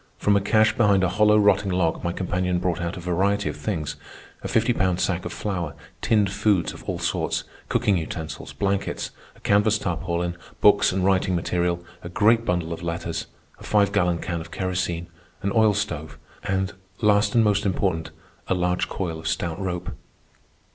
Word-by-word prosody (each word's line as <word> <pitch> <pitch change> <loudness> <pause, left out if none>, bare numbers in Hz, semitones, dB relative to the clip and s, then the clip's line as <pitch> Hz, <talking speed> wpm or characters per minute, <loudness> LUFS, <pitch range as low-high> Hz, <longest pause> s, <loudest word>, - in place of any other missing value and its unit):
From 105 - +2
a 100 - +3
cache 110 +2 +3
behind 100 -4 +4
a 90 - +3
hollow 105 +3 +4
rotting 105 -1 +4
log 90 -3 0
my 85 - 0
companion 90 0 -1
brought 90 -1 -1
out 85 +1 -3
a - - -5
variety 95 +4 0
of - - -5
things,—a 80 -8 -6
fifty - - +2
pound 90 -1 +1
sack 90 -1 0
of 85 - -4
flour, 85 -4 -3 0.3
tinned 105 -4 +2
foods 100 -4 +1
of - - -12
all - - -2
sorts, - - -1 0.3
cooking 100 -3 +2
utensils, 80 0 -6
blankets, 100 0 -2 0.2
a - - -19
canvas 105 +2 +3
tarpaulin, 85 -2 -2 0.2
books - - +5
and 95 0 0
writing 95 -1 +2
material, 85 0 -1 0.2
a 85 - -7
great 115 +5 +3
bundle 85 -3 -1
of 85 - -7
letters, 85 -1 -3 0.3
a - - -12
five 100 -2 +2
gallon 90 -4 +2
can 85 0 -3
of 85 - -10
kerosene, 90 -1 -2 0.4
an 100 - 0
oil 110 -2 +4
stove, 80 -7 -3 0.3
and, 95 0 -1 0.3
last 105 0 +3
and 115 - +6
most 105 -1 +2
important, 95 -4 0 0.4
a 95 - +1
large 90 0 0
coil 85 -4 -3
of 80 - -6
stout 85 +1 -2
rope. 90 -1 -3
90 Hz, 175 wpm, -24 LUFS, 85-100 Hz, 0.4 s, and